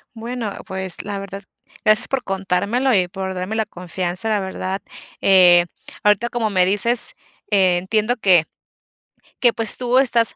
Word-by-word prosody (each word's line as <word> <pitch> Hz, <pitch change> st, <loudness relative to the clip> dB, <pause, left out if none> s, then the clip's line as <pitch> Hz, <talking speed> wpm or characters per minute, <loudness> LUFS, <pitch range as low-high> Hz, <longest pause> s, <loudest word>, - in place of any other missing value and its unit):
Bueno, 230 Hz, -1 st, -5 dB
pues, 190 Hz, -2 st, -2 dB
la 200 Hz, -1 st, -5 dB
verdad, 195 Hz, 0 st, -8 dB, 0.4 s
gracias 215 Hz, +3 st, +5 dB
por 270 Hz, -2 st, -2 dB
contármelo 195 Hz, +7 st, -1 dB
y 180 Hz, -2 st, +2 dB
por 190 Hz, 0 st, -5 dB
darme 185 Hz, +4 st, -4 dB
la 220 Hz, -1 st, 0 dB
confianza, 180 Hz, +1 st, -3 dB
la 215 Hz, -2 st, +1 dB
verdad, 190 Hz, 0 st, -5 dB, 0.4 s
eh, 180 Hz, -2 st, +6 dB, 0.4 s
ahorita, 210 Hz, +3 st, +2 dB
como 230 Hz, -3 st, -2 dB
me 185 Hz, -2 st, +2 dB
dices, 225 Hz, +5 st, +3 dB, 0.4 s
eh, 185 Hz, -3 st, +3 dB
entiendo 215 Hz, +6 st, -1 dB
que 180 Hz, -7 st, +4 dB, 0.9 s
que 240 Hz, -2 st, +4 dB
pues 225 Hz, -2 st, -1 dB
tú 250 Hz, +1 st, +1 dB
estás 235 Hz, -4 st, +3 dB
200 Hz, 150 wpm, -20 LUFS, 185-230 Hz, 0.9 s, eh